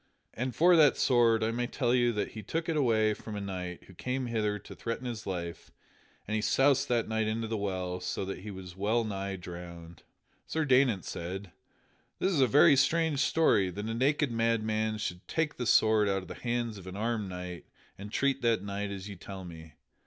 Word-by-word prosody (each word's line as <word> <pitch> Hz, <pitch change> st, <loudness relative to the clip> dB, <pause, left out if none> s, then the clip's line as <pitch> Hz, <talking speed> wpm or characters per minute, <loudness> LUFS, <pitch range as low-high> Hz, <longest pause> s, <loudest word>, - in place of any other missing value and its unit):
As 125 Hz, +2 st, -3 dB
for 175 Hz, +2 st, +6 dB
that 150 Hz, -4 st, +6 dB
sword, 115 Hz, -3 st, +4 dB
I 110 Hz, -, +1 dB
may 120 Hz, +1 st, -1 dB
tell 120 Hz, -1 st, 0 dB
you 120 Hz, -1 st, +3 dB
that 105 Hz, -, -2 dB
he 110 Hz, -, -7 dB
took 160 Hz, -, -3 dB
it 165 Hz, -, 0 dB
away 110 Hz, -6 st, +3 dB
from 105 Hz, 0 st, -8 dB
a -, -, -3 dB
knight 90 Hz, -3 st, -5 dB
who 95 Hz, -, -16 dB
came 130 Hz, +7 st, -3 dB
hither 110 Hz, -3 st, -1 dB
to -, -, -11 dB
threaten 115 Hz, +2 st, -4 dB
his 115 Hz, -4 st, -5 dB
life, 85 Hz, -3 st, -5 dB, 0.6 s
and 105 Hz, -, -3 dB
he 110 Hz, -, +1 dB
soused 135 Hz, +5 st, +3 dB
that 120 Hz, -2 st, +1 dB
knight 110 Hz, 0 st, 0 dB
into 110 Hz, +1 st, -2 dB
the 110 Hz, -, -2 dB
well 95 Hz, -3 st, -2 dB
so 90 Hz, +1 st, -3 dB
that 95 Hz, -, -5 dB
he 105 Hz, +3 st, -8 dB
was 95 Hz, -2 st, -9 dB
wellnigh 100 Hz, -1 st, -1 dB
drowned." 85 Hz, -2 st, -9 dB, 0.5 s
Sir 160 Hz, -1 st, -1 dB
Daynant 125 Hz, -7 st, +3 dB
said: 90 Hz, +2 st, -5 dB, 0.7 s
"That -, -, -2 dB
is 165 Hz, -8 st, +2 dB
a 130 Hz, -, +5 dB
very 140 Hz, +2 st, +6 dB
strange 155 Hz, +2 st, +2 dB
story, 135 Hz, -, +3 dB
that 105 Hz, +4 st, -5 dB
a 115 Hz, -, -2 dB
naked 140 Hz, +3 st, +1 dB
madman 110 Hz, -1 st, 0 dB
should 90 Hz, -3 st, -5 dB
take 160 Hz, -2 st, -1 dB
the 125 Hz, -, -2 dB
sword 110 Hz, -2 st, +4 dB
out 95 Hz, -1 st, 0 dB
of -, -, -12 dB
the -, -, -6 dB
hands 120 Hz, -3 st, -2 dB
of 95 Hz, -, -12 dB
an 95 Hz, -, -7 dB
armed 110 Hz, -2 st, -1 dB
knight 90 Hz, -1 st, -7 dB, 0.3 s
and 100 Hz, +1 st, -9 dB
treat 140 Hz, +3 st, +1 dB
that 115 Hz, -5 st, +2 dB
knight 100 Hz, 0 st, -3 dB
as 100 Hz, 0 st, -6 dB
ye 100 Hz, -, -7 dB
tell 95 Hz, +1 st, -8 dB
me. 80 Hz, -3 st, -11 dB
110 Hz, 210 wpm, -30 LUFS, 95-125 Hz, 0.7 s, for